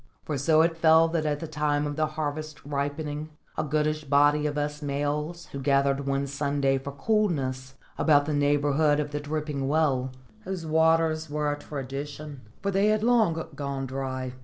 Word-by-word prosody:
For 150 - -2
so 155 +3 +4
it 165 0 0
fell 160 0 +6
that 160 -2 -1
at 145 -1 -1
the 165 - -4
time 150 -1 0
of 145 0 -3
the 155 0 +1
harvest's 155 -1 -5
ripening 145 +2 -3 0.3
a - - -1
goodish 155 +1 0
body 145 +1 +3
of 145 0 -3
us 150 0 -2
males 150 +4 -2
was 140 - -4
gathered 140 0 +2
one 140 0 0
Sunday 140 -1 0
for 140 +1 -6
coolness 135 -7 -1 0.2
about 145 -2 +4
the 150 - -2
neighbourhood 145 +1 +2
of 150 -1 -2
the 145 - -2
dripping 150 -2 -3
well, 140 -4 +1 0.3
whose 185 -3 -5
waters 160 0 +2
were 150 0 0
a 145 - -4
tradition, 145 +1 -6 0.2
for 200 - 0
they 195 +2 +3
had 215 0 +2
long 220 -9 +3
gone 140 -1 -3
dry. 130 -1 -4
150 Hz, 175 wpm, -27 LUFS, 140-155 Hz, 0.3 s, fell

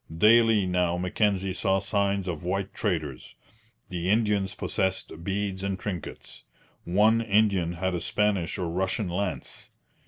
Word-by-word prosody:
Daily 110 +1 +5
now 90 -1 +1
Mackenzie 95 +1 0
saw 95 +1 +1
signs 100 -1 0
of 85 -3 -4
white 95 +2 -2
traders. 75 -7 -3 0.5
The 90 0 -3
Indians 105 -2 +1
possessed 95 -5 -2
beads 95 0 -2
and 100 -1 -2
trinkets. 90 -5 -7 0.4
One 105 +6 +4
Indian 100 -5 +2
had 95 +2 -2
a 85 - -2
Spanish 105 -5 0
or 90 - -2
Russian 95 +3 -1
lance. 95 +2 -4
95 Hz, 130 wpm, -27 LUFS, 90-105 Hz, 0.5 s, Daily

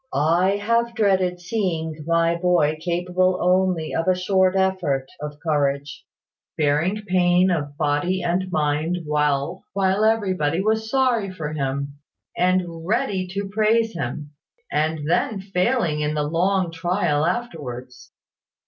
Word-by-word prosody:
"I 170 +7 +3
have 230 +3 0
dreaded 190 -5 +1
seeing 170 -5 -3
my 170 0 +2
boy 170 -3 +2
capable 180 +2 0
only 180 -3 +1
of 165 - -1
a 185 - +4
short 185 0 +2
effort 190 -8 0
of 150 0 -7
courage; 145 -2 -1 0.5
bearing 160 +8 +1
pain 180 -1 +3
of 145 -4 -3
body 155 +5 0
and 180 +2 -1
mind 155 +2 0
well 150 +3 0
while 195 +1 +1
everybody 185 -8 +1
was 220 +2 0
sorry 245 -6 +1
for 155 -4 -5
him, 140 0 -3 0.4
and 180 -2 0
ready 195 -1 -1
to 200 0 -3
praise 220 +2 +2
him; 145 -1 -5 0.4
and 155 0 -1
then 195 +5 +1
failing 190 -3 0
in 150 +1 -1
the 150 - 0
long 175 +3 +1
trial 165 -2 0
afterwards. 150 - -4
175 Hz, 130 wpm, -22 LUFS, 150-190 Hz, 0.5 s, a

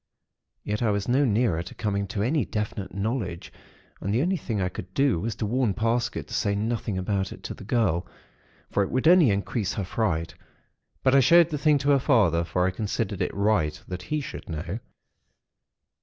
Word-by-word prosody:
Yet 105 +2 -2
I 115 - +2
was 100 -1 -1
no 135 +4 +3
nearer 110 -7 +1
to 85 - -9
coming 100 -1 -1
to 100 +1 -2
any 140 +4 +1
definite 105 -2 -4
knowledge; 100 -4 -3 0.5
and 100 - -3
the 120 +6 +2
only 185 +3 +1
thing 115 - -3
I 90 - +1
could 90 0 -7
do 135 -10 +3
was 110 +4 -3
to 110 - -3
warn 115 -2 +1
Parsket 115 +3 -1
to - - -9
say 100 -2 +1
nothing 110 -1 -2
about 95 0 -1
it - - -10
to - - -5
the - - -11
girl; 100 -6 +1 0.6
for - - +2
it 95 - 0
would 130 +4 +1
only 170 -6 +7
increase 100 +1 -1
her 100 - -3
fright; 90 -5 -1 0.7
but 130 - +4
I 140 - +7
showed 170 +6 +6
the 150 - -2
thing 150 0 +4
to 140 +1 +1
her 140 - +5
father, 100 - +3
for 85 +2 0
I 95 - +1
considered 105 0 -3
it - - 0
right 100 -7 +1
that 90 -1 -5
he 150 +10 -2
should 135 - -8
know. 85 +6 -4
105 Hz, 200 wpm, -26 LUFS, 95-125 Hz, 0.7 s, only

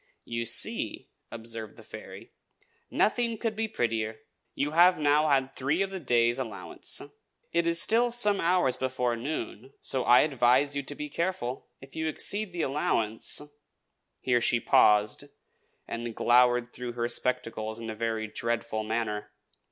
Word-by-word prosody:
"You 115 0 -3
see!" 115 - 0 0.2
observed 115 -2 -6
the - - -12
fairy. - - -11 0.6
"Nothing 230 +1 +1
could 220 0 -2
be 220 +1 -1
prettier. 115 - -2 0.3
You 145 +1 -1
have 175 +3 +5
now 150 +1 +3
had 135 -1 +1
three 145 +8 0
of 195 - -5
this 190 -2 -5
day's 120 -2 +2
allowance. 110 -7 -2 0.5
It 170 0 +1
is 170 0 +3
still 235 +6 +3
some 210 -4 +3
hours 170 -7 +2
before 125 -2 -1
noon, 130 -1 -5
so 130 -2 -1
I 120 - +6
advise 135 0 +2
you 140 - -1
to 140 +1 -8
be 150 - -5
careful. 150 -6 -3
If 135 0 -13
you 160 0 -2
exceed 200 +5 -2
the 175 -2 -2
allowance 115 -4 +1 0.4
" - - -52
Here 125 -2 +2
she 120 - +3
paused, 105 +3 +3 0.6
and 115 -1 -5
glowered 125 0 +3
through 125 -1 -6
her 120 0 -1
spectacles 115 -2 -2
in 115 -1 -6
a - - -7
very 110 0 -2
dreadful 115 0 -3
manner. 105 -2 -3
125 Hz, 155 wpm, -28 LUFS, 115-155 Hz, 0.6 s, I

